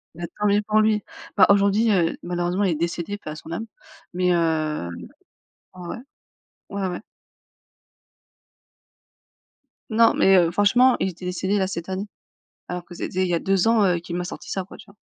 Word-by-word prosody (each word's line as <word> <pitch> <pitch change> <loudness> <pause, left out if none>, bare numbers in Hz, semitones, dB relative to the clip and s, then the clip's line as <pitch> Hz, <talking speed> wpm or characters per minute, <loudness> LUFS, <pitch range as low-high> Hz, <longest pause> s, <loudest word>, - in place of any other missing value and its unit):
Bah, 175 - -8 0.2
tant 210 - 0
mieux 205 +1 +3
pour 215 0 +3
lui. 215 -1 +2 0.3
Bah - - +7
aujourd'hui, 200 +3 +4
heu, 170 -4 +2
malheureusement, 175 +2 -1
il 190 - +2
est - - -3
décédé, 170 +4 -3
paix 155 -7 -8
à - - -7
son 160 - -10
âme, 195 +7 -4 0.5
mais, 180 0 +1
heu, 155 - 0 0.9
ouais. 180 +3 -7 0.7
Ouais, 200 -1 -2
ouais. 180 - -5 3.0
Non, 230 - +6
mais, 195 0 +4
heu, 170 -2 +3
franchement, 245 +7 +4
il 190 - 0
était 180 +1 -10
décédé 190 +3 -1
là, 190 - +1
cette 175 -1 -6
année, 190 +2 -3 0.6
alors 180 0 -5
que 175 - -12
c'était 185 +2 -3
il - - -1
y 175 - +1
a - - +2
2 195 0 +1
ans, 225 -3 +4
heu, 175 -2 +2
qu'il 170 +1 -6
m'a 180 - -2
sorti - - -8
ça, 190 - -2
quoi, 185 - -13
tu - - -14
vois? 200 - -19
185 Hz, 185 wpm, -23 LUFS, 175-200 Hz, 3.0 s, Bah